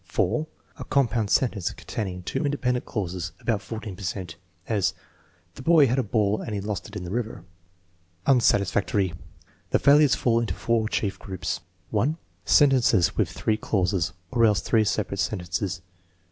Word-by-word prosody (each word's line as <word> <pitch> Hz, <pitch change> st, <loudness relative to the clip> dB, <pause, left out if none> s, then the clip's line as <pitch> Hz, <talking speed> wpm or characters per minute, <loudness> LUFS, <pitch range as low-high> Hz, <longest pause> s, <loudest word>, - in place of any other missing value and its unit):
(4) 155 Hz, 0 st, 0 dB, 0.3 s
A -, -, -4 dB
compound 115 Hz, -6 st, +1 dB
sentence 105 Hz, -9 st, +1 dB
containing 90 Hz, -4 st, -5 dB
two 85 Hz, -, -2 dB
independent 125 Hz, -4 st, 0 dB
clauses 90 Hz, -4 st, -3 dB
(about 110 Hz, -4 st, -1 dB
14 105 Hz, 0 st, -6 dB
per 100 Hz, -, -12 dB
cent); 90 Hz, -2 st, -4 dB, 0.3 s
as: 105 Hz, -4 st, +1 dB, 0.6 s
"The -, -, -10 dB
boy 160 Hz, +1 st, +6 dB
had 130 Hz, +1 st, +1 dB
a -, -, +2 dB
ball 105 Hz, -1 st, +1 dB
and 110 Hz, -, -4 dB
he -, -, -1 dB
lost 105 Hz, 0 st, -4 dB
it 105 Hz, -, -13 dB
in 100 Hz, -, -4 dB
the 90 Hz, -, -6 dB
river," 115 Hz, 0 st, -3 dB, 0.8 s
Un&atijrfactory. 100 Hz, -6 st, +2 dB, 0.6 s
The -, -, +3 dB
failures 145 Hz, 0 st, +5 dB
fall 115 Hz, -2 st, +2 dB
into 110 Hz, -7 st, -2 dB
four 115 Hz, -2 st, 0 dB
chief 100 Hz, -4 st, -1 dB
groups: 95 Hz, -3 st, -4 dB, 0.3 s
(1) 150 Hz, +6 st, +1 dB, 0.3 s
Sentences 130 Hz, -, +4 dB
with -, -, +1 dB
three 110 Hz, -1 st, -1 dB
clauses 95 Hz, -4 st, 0 dB, 0.2 s
(or 120 Hz, -2 st, +2 dB
else 105 Hz, -6 st, +4 dB
three 110 Hz, +2 st, +2 dB
separate 100 Hz, -1 st, -1 dB
sen 105 Hz, -, 0 dB
tences). 90 Hz, +1 st, -3 dB
105 Hz, 160 wpm, -25 LUFS, 95-120 Hz, 0.8 s, boy